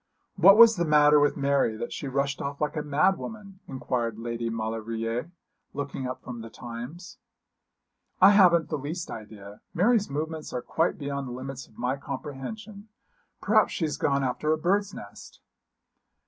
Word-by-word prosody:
'What 195 +3 +7
was 230 -2 +8
the 170 - +1
matter 150 -1 +5
with 145 0 +2
Mary 140 -5 +1
that 120 +1 -5
she 140 - -5
rushed 140 +1 -1
off 140 0 -4
like 150 +1 -1
a 150 - -1
mad 150 +6 +2
woman?' 205 -4 -9
inquired 120 -4 -3
Lady 115 0 -4
Maulevrier, 115 +4 -3 0.5
looking 140 -2 -4
up 130 - -6
from 120 -2 -7
the 115 - -9
Times. 125 +10 -9 1.0
'I - - +8
haven't 175 -5 +5
the 155 - -2
least 160 +5 -5
idea. 105 -2 -10
Mary's 210 +4 +3
movements 155 +2 -4
are 125 - -3
quite 165 +1 0
beyond 140 -2 -4
the - - -6
limits 130 +1 -7
of - - -24
my 130 +2 -1
comprehension. 190 +11 -7 0.5
Perhaps - - +3
she 165 - -1
has 150 - -3
gone 140 -1 +1
after 135 +4 -1
a 155 - +2
bird's 195 +5 +1
nest.' - - -12
140 Hz, 165 wpm, -27 LUFS, 125-170 Hz, 1.0 s, was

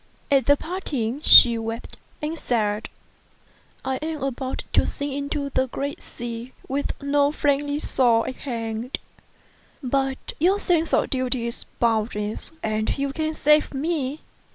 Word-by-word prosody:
At 270 -3 +4
parting 285 -8 -3
she 235 -6 +9
wept, 225 +1 -5 0.3
and 310 +2 -2
said, 215 -7 -1 0.5
" - - -29
I 265 0 0
am 310 -1 -4
about 265 -1 -3
to - - +4
sink 285 -1 -3
into 280 0 -3
the 260 0 +1
great 280 +3 -4
sea, 235 +1 -7
with 280 +2 -2
no 285 0 +3
friendly 290 -1 +1
shore 235 -6 +2
at 255 - -5
hand. 230 -1 -4 0.9
But 270 +1 -1
your 370 +6 +4
sense 335 -4 +1
of - - +2
duty 255 -2 -1
is 235 - -2
boundless, 215 -1 0
and 215 0 -1
you 275 0 -1
can 315 0 -2
save 300 -1 +3
me. 295 -1 -2
270 Hz, 140 wpm, -24 LUFS, 235-290 Hz, 0.9 s, she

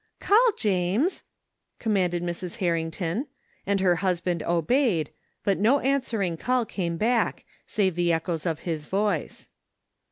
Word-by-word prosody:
" - - -52
Call, 460 +4 +5
James! 205 - +1 0.3
" - - -55 0.2
commanded 180 -6 0
Mrs. 175 0 -4
Harrington, 170 - -1 0.4
and 200 0 +2
her 180 -2 +3
husband 180 -2 0
obeyed, 175 - +1 0.3
but 200 -2 +1
no 235 +8 +4
answering 230 -11 0
call 250 +5 +1
came 170 -5 -3
back, 230 +3 +1 0.2
save 190 -4 +1
the 175 0 +1
echoes 165 0 -1
of 160 -2 -2
his 160 -4 -3
voice. 205 +2 -1
185 Hz, 135 wpm, -26 LUFS, 170-225 Hz, 0.4 s, Call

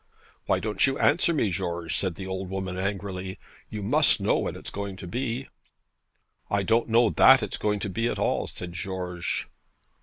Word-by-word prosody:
'Why - - +2
don't 110 +4 +1
you 135 - 0
answer 170 +3 +3
me, 125 - +1
George?' 85 -3 -2
said 95 -4 -1
the 95 - -7
old 95 0 -4
woman 95 -1 -3
angrily. 95 -1 -3 0.3
'You 105 -2 -5
must - - +4
know - - +2
when - - -2
it's - - -8
going 100 -1 -4
to 95 - -9
be.' 125 +5 -3 1.0
'I 100 -1 +1
don't 115 +3 +2
know 115 0 +4
that 130 -3 +7
it's 105 - -4
going 105 -1 +1
to 100 - -2
be 115 +5 -1
at - - -2
all,' - - 0
said 85 -1 -7
George. 90 -2 -3
100 Hz, 185 wpm, -26 LUFS, 95-115 Hz, 1.0 s, that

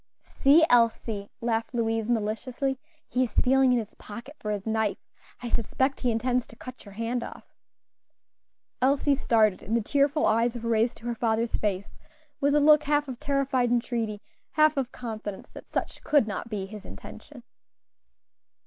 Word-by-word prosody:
"See, 300 +4 +4
Elsie," 230 -4 +2
laughed 230 +1 -1
Louise, 225 -1 0
maliciously, 240 +4 -1 0.3
"he 255 +1 +1
is 225 - -9
feeling 265 0 +4
in 250 - +3
his 220 -4 -4
pocket 235 +8 -10
for 210 - -5
his 205 -2 -3
knife. 220 -2 0 0.5
I 240 - -3
suspect 260 +5 0
he 250 - 0
intends 245 +2 0
to - - -15
cut 255 +2 -10
your 200 - -12
hand 230 +3 -2
off." - - -11 1.3
Elsie 280 +2 +3
started, 220 -7 +2
and 225 +3 0
the 230 - -1
tearful 285 +5 +2
eyes 230 +2 +2
were 230 -1 -3
raised 225 +2 +1
to 230 - -14
her 240 - -1
father's 230 0 0
face 200 -2 -3 0.4
with 285 +1 +2
a - - +5
look 300 +1 +6
half 290 0 +1
of 250 -2 -7
terrified 275 -3 +1
entreaty, 230 -3 -1 0.3
half 310 0 +4
of 265 -3 -2
confidence 215 -4 -6
that - - -12
such - - -4
could 290 -7 +3
not 210 +3 -4
be 205 -4 -3
his 210 +1 -10
intention. 95 - -11
235 Hz, 165 wpm, -27 LUFS, 220-265 Hz, 1.3 s, look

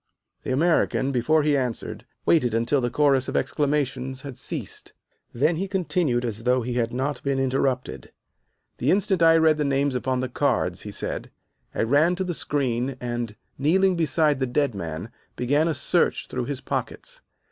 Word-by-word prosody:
The - - -4
American, 140 -2 +2
before 150 +5 +2
he 150 -1 +3
answered, 125 -4 -3 0.2
waited 125 -9 +3
until 115 +5 +1
the 120 - 0
chorus 135 -1 +2
of - - -1
exclamations 135 -3 -1
had 140 -3 -7
ceased. - - -4 0.4
Then 150 +7 +1
he 195 +3 -2
continued 170 -9 0
as 115 -2 -4
though 125 +1 +2
he 125 +1 -3
had 120 -1 0
not 135 +4 -2
been 140 -1 -1
interrupted. 135 -1 -1 0.7
"The 130 - +1
instant 190 -1 +2
I 165 0 +7
read 160 -1 +4
the - - +2
names 140 0 +1
upon 130 0 -1
the 130 - -1
cards," 125 - 0
he - - -7
said, - - -4 0.5
"I - - +1
ran 145 +9 +3
to 190 - -2
the 180 -1 -2
screen 130 -4 -1
and, 120 -3 -4 0.2
kneeling 185 +6 +3
beside 155 -3 +2
the 130 - 0
dead 140 +1 +1
man, 85 +1 -5 0.2
began 145 +6 +1
a 160 - 0
search 140 - +1
through - - -4
his - - -4
pockets. - - -4
135 Hz, 175 wpm, -24 LUFS, 125-155 Hz, 0.7 s, I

